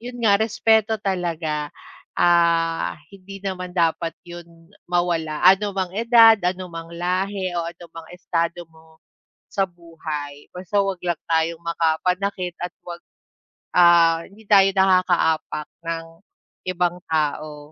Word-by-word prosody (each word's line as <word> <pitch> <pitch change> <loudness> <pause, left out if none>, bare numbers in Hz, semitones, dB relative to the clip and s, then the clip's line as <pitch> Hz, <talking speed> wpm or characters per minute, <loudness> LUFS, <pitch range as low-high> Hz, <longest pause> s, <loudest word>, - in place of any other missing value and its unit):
'yon 245 +1 -8
nga 200 -2 +4
respeto 220 0 +2
talaga, 165 -6 -2 0.5
ah, 170 -1 +2 0.2
hindi 195 0 -11
naman 185 -2 -4
dapat 165 -1 0
'yon 175 -1 -10 0.4
mawala 170 -3 -1
anumang 195 -1 +3
edad, 230 -1 +7
anumang 175 -2 -4
lahi, 185 +2 -2
o 170 - -2
anumang 165 -1 -12
estado 170 -1 -2
mo 160 0 -21 0.6
sa 195 - +2
buhay, 155 -4 -8
basta 185 +3 -2
'wag 195 -2 -2
lang 175 -2 -1
tayong 165 +1 0
makapanakit 180 +3 -1
at 175 0 -5
'wag, 175 -1 -7 0.8
ah, 170 -1 +5
hindi 210 +3 -18
tayo 200 -1 +6
nakakaapak 180 -5 +2 0.2
ng 165 0 -3 0.6
ibang 180 -1 -1
tao. 150 -1 -2
175 Hz, 115 wpm, -22 LUFS, 165-190 Hz, 0.8 s, edad